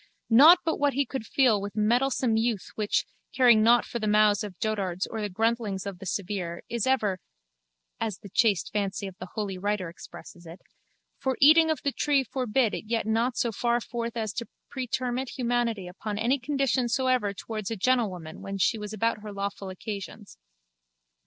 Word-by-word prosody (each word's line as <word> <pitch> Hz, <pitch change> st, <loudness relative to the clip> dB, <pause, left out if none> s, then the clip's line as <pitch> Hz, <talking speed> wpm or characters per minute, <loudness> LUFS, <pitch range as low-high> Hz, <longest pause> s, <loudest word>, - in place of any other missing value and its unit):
Not 300 Hz, +10 st, +9 dB
but 325 Hz, -, 0 dB
what 285 Hz, -1 st, +2 dB
he 280 Hz, +1 st, +1 dB
could 260 Hz, -5 st, -6 dB
feel 240 Hz, -7 st, +3 dB
with 205 Hz, 0 st, -6 dB
mettlesome 240 Hz, +2 st, +2 dB
youth 225 Hz, -3 st, -1 dB
which, 210 Hz, -1 st, 0 dB, 0.3 s
caring 245 Hz, -4 st, +6 dB
nought 235 Hz, +2 st, +5 dB
for 235 Hz, -, -5 dB
the 215 Hz, -, -2 dB
mows 210 Hz, -1 st, +4 dB
of 195 Hz, -4 st, -8 dB
dotards 195 Hz, -4 st, -2 dB
or 220 Hz, -, -5 dB
the 205 Hz, -, -2 dB
gruntlings 220 Hz, -1 st, -1 dB
of 195 Hz, -3 st, -6 dB
the 195 Hz, -, -8 dB
severe, 185 Hz, -4 st, -3 dB
is 235 Hz, 0 st, -2 dB
ever 210 Hz, -8 st, +1 dB, 0.8 s
(as 215 Hz, -4 st, -2 dB
the 200 Hz, -, -12 dB
chaste 200 Hz, -3 st, +2 dB
fancy 200 Hz, -1 st, -2 dB
of 190 Hz, -2 st, -7 dB
the 185 Hz, -, -7 dB
Holy 200 Hz, -4 st, -3 dB
Writer 205 Hz, -2 st, -1 dB
expresses 170 Hz, 0 st, -12 dB
it) 165 Hz, +3 st, -10 dB, 0.6 s
for 265 Hz, -2 st, -1 dB
eating 320 Hz, +3 st, +7 dB
of 315 Hz, -, -1 dB
the 280 Hz, -, +1 dB
tree 280 Hz, 0 st, +1 dB
forbid 250 Hz, -3 st, 0 dB
it -, -, -5 dB
yet 230 Hz, 0 st, -1 dB
not 230 Hz, +3 st, 0 dB
so 235 Hz, -3 st, +1 dB
far 235 Hz, +2 st, 0 dB
forth 235 Hz, 0 st, -5 dB
as 215 Hz, -3 st, -2 dB
to 235 Hz, -1 st, -5 dB, 0.2 s
pretermit 255 Hz, 0 st, -3 dB
humanity 235 Hz, -6 st, -1 dB
upon 205 Hz, +3 st, -5 dB
any 245 Hz, +6 st, +1 dB
condition 265 Hz, -2 st, 0 dB
soever 255 Hz, -4 st, +1 dB
towards 215 Hz, 0 st, -6 dB
a 225 Hz, -, -2 dB
gentlewoman 195 Hz, -8 st, -1 dB
when 195 Hz, 0 st, -5 dB
she 215 Hz, +3 st, +1 dB
was 210 Hz, 0 st, -6 dB
about 225 Hz, +1 st, 0 dB
her 210 Hz, 0 st, -7 dB
lawful 200 Hz, -1 st, -4 dB
occasions. 190 Hz, -, -8 dB
220 Hz, 185 wpm, -27 LUFS, 200-245 Hz, 0.8 s, Not